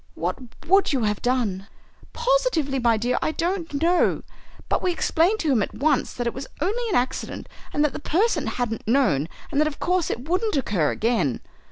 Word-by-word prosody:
"What - - -2 0.3
would 385 -1 +4
you 260 -4 +1
have 210 -1 0
done?" 225 -7 0 0.4
"Positively, 475 - +1
my 235 -2 +3
dear, 240 +3 0
I 310 - 0
don't 335 -4 -2
know. 350 +1 +2 0.4
But - - 0
we 365 - +1
explained 345 +4 +2
to 310 - +1
him 240 -5 +3
at - - -3
once 290 -1 +1
that 245 - -3
it 235 - -1
was 265 +1 -6
only 445 +9 -1
an 385 - 0
accident 250 -2 -2 0.2
and 295 +1 +2
that 295 - -1
the - - -5
person 380 +10 +1
hadn't 225 -3 -3
known 170 - +2 0.2
and 285 - +2
that 305 - +3
of 300 - -5
course 360 -1 +1
it 245 +5 -4
wouldn't 375 +1 0
occur 195 - +1
again. 220 - 0
280 Hz, 195 wpm, -24 LUFS, 235-355 Hz, 0.4 s, would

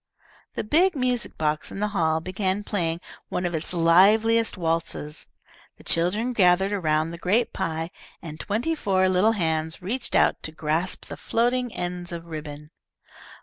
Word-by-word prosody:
The - - -2
big 335 - +3
music 250 -3 0
box 150 -1 -1
in - - -6
the 210 0 0
hall 160 -5 +1
began 190 +3 -2
playing 170 -5 -1 0.3
one 180 - -2
of 175 - -2
its 160 -1 -1
liveliest 205 +7 +4
waltzes, 165 -3 -2 0.5
the - - -16
children 205 +9 0
gathered 190 -1 +4
around 160 -4 0
the 170 - -8
great 215 +8 +1
pie, 165 +1 -3 0.3
and 155 -1 -9
twenty 230 +11 -1
four 190 -10 +1
little 185 +5 +3
hands 160 -4 -1
reached 235 +8 -3
out - - +3
to 155 - -5
grasp 160 +3 -1
the - - -8
floating 245 +1 0
ends 175 0 -4
of 170 -1 -6
ribbon. 150 -2 -8
180 Hz, 155 wpm, -25 LUFS, 160-210 Hz, 0.5 s, liveliest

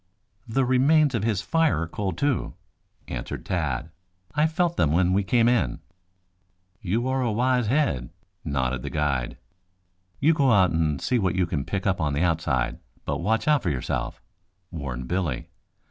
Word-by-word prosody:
"The 130 +3 +1
remains 140 +3 +4
of 115 -4 -1
his 105 -4 0
fire 165 - +2
are - - -4
cold, 95 0 -3
too," 145 -3 0 0.5
answered - - -5
Tad. 80 -4 -2 0.4
"I 150 +2 +3
felt 170 +1 0
them 75 -2 +2
when 90 +2 +3
we 100 +1 +2
came 115 +4 +3
in." 115 - +2 1.0
"You 110 +7 -1
are 130 0 0
a 120 -3 0
wise 125 +1 +1
head," 115 - +1 0.3
nodded 65 -2 -1
the - - -5
guide. 70 -6 -1 0.8
"You 155 +4 +4
go 140 -4 +3
out 95 -3 +4
and 80 -3 0
see 125 - +1
what 95 -4 0
you 95 -1 +2
can 75 -5 -3
pick 95 -2 -3
up 95 -4 +1
on 75 -2 0
the 75 +5 +1
outside, 75 -8 0 0.3
but - - -2
watch 110 +5 0
out 150 -3 +4
for 90 - -1
yourself," 65 -4 -3 0.5
warned 65 -7 -5
Billy. 90 -1 -2
95 Hz, 170 wpm, -25 LUFS, 75-125 Hz, 1.0 s, remains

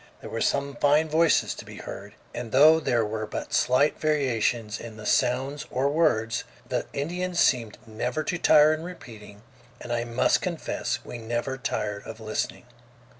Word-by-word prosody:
There - - -9
were - - -3
some 140 0 0
fine 150 +2 +3
voices 165 +2 +3
to - - -9
be - - -11
heard, 100 +2 -9 0.2
and 120 -2 -6
though 155 +5 +7
there 120 -7 +1
were 110 0 -4
but - - -6
slight 130 +4 +3
variations 120 -7 0
in 115 -2 -9
the 110 - -9
sounds 135 +7 0
or 135 +2 0
words, 115 -8 +1 0.2
the - - -2
Indians 175 +5 -2
seemed 115 -6 +2
never 120 +6 -3
to 180 - -2
tire 155 -1 +6
in 155 - -4
repeating, 110 - -11 0.4
and 120 - -5
I 120 0 0
must 115 0 +2
confess - - -3
we 120 - -7
never 120 +3 -3
tired 105 -7 -3
of 110 0 -8
listening. 110 +2 -3
125 Hz, 170 wpm, -26 LUFS, 110-150 Hz, 0.4 s, though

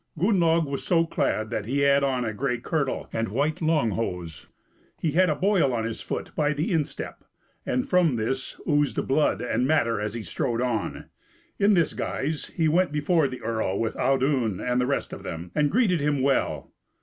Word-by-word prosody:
Gunnlaug 170 -3 +3
was 140 -1 -4
so 165 -2 +3
clad 110 -9 -1
that 105 - -2
he 135 +5 0
had 140 0 +4
on 130 -3 0
a 110 - -2
grey 125 +3 -1
kirtle 140 +3 -2
and 115 0 -1
white 145 - -1
long 155 -8 +2
hose; 90 -7 -4 0.5
he 160 - 0
had 180 +3 +3
a 150 - +1
boil 185 -7 +2
on 115 -2 -1
his 115 0 -4
foot - - -5
by 150 -1 +1
the 150 +2 -2
instep, 155 -3 -3 0.4
and 125 - 0
from 175 -7 +3
this 130 +4 -3
oozed 145 -2 +1
blood 135 -6 +2
and 125 +1 0
matter 115 -8 +2
as 105 +1 -3
he 115 - -4
strode 115 +1 -2
on. 125 -3 -2 0.5
In 200 0 +4
this 170 -3 +2
guise 150 +2 -3
he 165 -2 0
went 175 +3 +2
before 150 +1 +2
the 130 -1 -7
earl 110 -4 -1
with 115 -1 -1
Audun 130 -7 +1
and 125 0 0
the 125 - 0
rest 140 - -2
of - - -7
them, 85 +2 -6
and 150 -1 +2
greeted 195 - +2
him 145 -2 +1
well. 135 0 0
140 Hz, 195 wpm, -25 LUFS, 115-160 Hz, 0.5 s, had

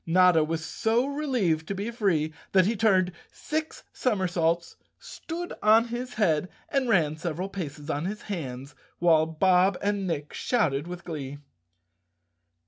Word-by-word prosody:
Notta 180 -1 +5
was 160 +1 -3
so 230 +6 +1
relieved 250 - 0
to 200 - -3
be 205 +4 -3
free 175 -10 0 0.2
that 190 -2 +6
he 225 +4 +1
turned 190 -4 +3 0.2
six 310 +1 -4
somersaults, 175 -7 0 0.2
stood 350 +1 -7
on 225 +2 +5
his 245 +1 -5
head, 180 -5 +1 0.2
and 270 -3 0
ran 155 -7 +2
several 170 +3 -3
paces 150 -6 -6
on 150 0 -2
his 210 +4 -4
hands, 140 -8 -5 0.2
while 160 -2 +4
Bob 180 +3 +3
and 200 -1 -1
Nick 150 -4 -3
shouted 160 - 0
with 180 0 -7
glee. 145 -4 -6
185 Hz, 140 wpm, -27 LUFS, 160-220 Hz, 0.2 s, that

